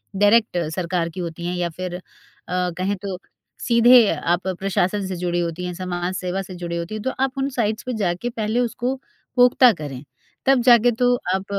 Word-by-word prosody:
direct 205 -1 +3 0.2
सरकार 175 -1 -1
की 175 - -9
होती 170 -1 -5
हैं 180 - -2
या 175 -1 -1
फिर 180 +2 -6
अ, 180 - -7 0.5
कहें 180 +2 -1
तो 195 -2 -4 0.5
सीधे 235 -1 +7
आप 175 +3 -1
प्रशासन 190 +1 -1
से 185 - -4
जुड़ी 175 0 -1
होती 170 +1 -3
हैं, 180 - -4
समाज 180 0 -3
सेवा 185 +1 -2
से 185 -1 -9
जुड़ी 175 -1 -5
होती 170 +5 -5
हैं 215 - -5
तो 260 - 0
आप 270 +1 -2
उन 270 +1 0
साइट्स 220 -5 -1
पे 255 - -4
जाके 195 +4 -1
पहले 225 0 -2
उसको 245 +2 -1 0.4
पुख्ता 250 0 +6
करें, 145 -5 -7 0.4
तब 270 -2 +4
जाके 240 -1 +6
तो 245 0 +4 0.2
आप 190 0 -4
190 Hz, 190 wpm, -22 LUFS, 175-235 Hz, 0.5 s, सीधे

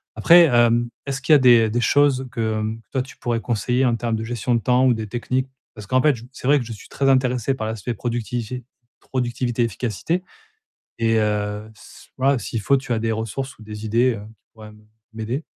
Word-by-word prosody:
Après, 170 +11 +7
hem, 120 -3 +3 0.2
est-ce 135 0 -4
qu'il 135 - -1
y - - +10
a 145 - +6
des 120 -3 +6
des 120 +3 -1
choses 135 +1 +3
que, 110 -1 -1
hem, 110 +1 -4
toi, 130 - 0
tu 130 +1 -10
pourrais 120 -1 -1
conseiller 125 +3 0
en 120 -2 +2
termes 115 0 -2
de 110 - -4
gestion 120 +1 -2
de - - +2
temps 125 +3 +3
ou 130 - +5
des 110 -2 -4
techniques? 125 +4 -2 0.3
Parce 105 -2 -10
qu'en 130 +4 +2
fait, 150 -1 +3 0.2
c'est 130 - -6
vrai 145 +1 +5
que 120 - -5
je 115 - -7
suis 105 - -13
très 135 0 0
intéressé 130 -1 +2
par 110 -5 -4
l'aspect 110 +2 -4
productivité- 120 +1 -4 0.3
productivité, 120 -1 -2
efficacité 120 - -2 0.8
et 115 -1 +2
heu 105 0 -1
c - - -16
voilà, 135 +1 +2
s'il 115 -1 -4
faut, 140 +7 +3
tu 130 -2 -4
as 115 - 0
des 115 0 -1
ressources 115 +5 -4
ou - - -14
des 105 0 -8
idées, 120 +4 +2
heu, 105 - -7 0.2
qui - - -50
pourraient 110 -1 -12
m 105 0 -18 0.3
m'aider. 115 +6 -3
120 Hz, 220 wpm, -22 LUFS, 110-130 Hz, 0.8 s, y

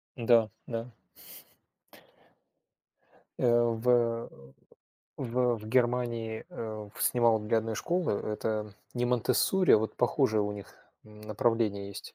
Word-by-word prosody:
М-да, 115 -2 +3 0.2
да. 115 +1 -5 2.5
Э, 120 -1 +4
в, 115 +1 0
э, 115 -1 +2 0.9
в, 125 -1 0
в 110 -1 -10
Германии, 120 -2 0
э, 110 -2 -6
в - - -5
снимал 115 -2 +3
для 105 +2 +1
одной 110 0 -3
школы, 175 - 0
это 105 0 -3 0.2
не 120 0 0
Монтессори, 125 - +2
а - - +8
вот 110 +1 -3
похожее 125 -3 +2
у 105 - -2
них 100 -1 -10 0.3
направление 105 -1 -1
есть. 100 - -9
115 Hz, 120 wpm, -29 LUFS, 110-120 Hz, 2.5 s, а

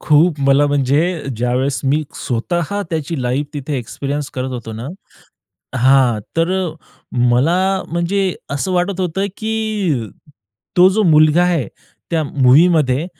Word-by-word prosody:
खूप, 155 +1 +3
मला 140 +1 +4
म्हणजे 145 0 +2 0.4
ज्यावेळेस 125 +3 -1
मी 145 +3 +1
स्वतः 170 - -2
त्याची 155 -3 -3
लाईफ 130 +4 -1
तिथे 145 0 -3
एक्सपिरियन्स 140 +4 -4
करत 130 0 -3
होतो 120 -3 -6
ना 115 +4 -6 0.9
हां, 130 -3 +4 0.2
तर 165 +2 +2
अ, 190 -2 0 0.6
मला 180 +10 +2
म्हणजे 180 +3 -1 0.2
असं 145 +7 -2
वाटत 180 +1 0
होतं, 185 +2 -1
की 215 - -2 0.7
तो 180 +1 +7
जो 215 +3 +1
मुलगा 155 0 +5
आहे 170 -8 0 0.4
त्या 165 -2 +1
मूव्हीमध्ये 145 +2 +3
150 Hz, 125 wpm, -17 LUFS, 130-180 Hz, 0.9 s, तो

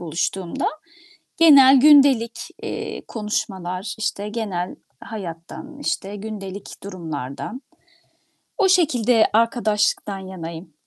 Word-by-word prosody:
buluştuğumda; 175 - -2 0.7
genel 275 -5 +8
gündelik, 275 -5 +5 0.2
eee, - - -5
konuşmalar. 195 -3 -4
İşte, 210 -1 -2
genel 205 -5 -3 0.3
hayattan, 205 - -8
işte, 205 -7 -3
gündelik 200 -2 -8
durumlardan, 165 - -6 1.0
o 400 - +4
şekilde 250 - +3
arkadaşlıktan 215 -3 +1
yanayım. 170 -3 -8
210 Hz, 85 wpm, -22 LUFS, 185-245 Hz, 1.0 s, genel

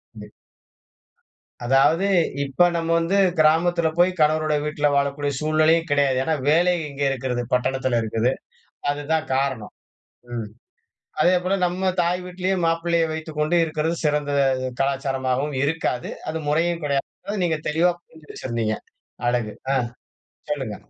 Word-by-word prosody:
ம். - - -11 1.3
அதாவது, 145 +8 +3 0.4
இப்ப 140 +4 +2
நம்ம 165 -1 -2
வந்து 170 +4 +1 0.2
கிராமத்துல 165 +2 +3
போய் 175 +1 +4
கணவரோட 155 0 +2
வீட்ல 150 -1 0
வாழக்கூடிய 140 +1 0
சூழ்நிலையும் 155 +2 +2
கிடையாது. 140 -2 +2
ஏன்னா, 160 +2 0
வேலை 175 +4 +4 0.2
இங்க 140 0 -4
இருக்கிறது. 130 -2 -2
பட்டணத்துல 130 -1 +1
இருக்குது. 115 +3 0 0.6
அதுதான் 145 +2 -1
காரணம். 135 -5 -2 0.6
ம். 115 -3 -4 0.8
அதேபோல 180 +2 +2
நம்ம 185 +2 0
தாய் 175 +1 0
வீட்டிலேயே 185 +1 -1
மாப்பிள்ளைய 165 0 +1
வைத்துக் 160 -1 -6
கொண்டு 155 +3 +2
இருக்கிறது 160 +1 -2
சிறந்த 150 -1 0 0.5
கலாச்சாரமாகவும் 135 0 -1
இருக்காது. 145 -5 -1 0.2
அது 160 - -3
முறையும் 165 +3 +1
கிடையாது. 140 -1 -1 0.3
நீங்க 160 -3 0
தெளிவா 170 +4 +3
புரிஞ்சு 160 -2 -19
வச்சிருந்தீங்க. 115 -3 -2 0.5
அழகு. 120 -3 0 0.2
ஆ. - - +2 0.8
சொல்லுங்க. - - -3
150 Hz, 120 wpm, -23 LUFS, 135-165 Hz, 1.3 s, போய்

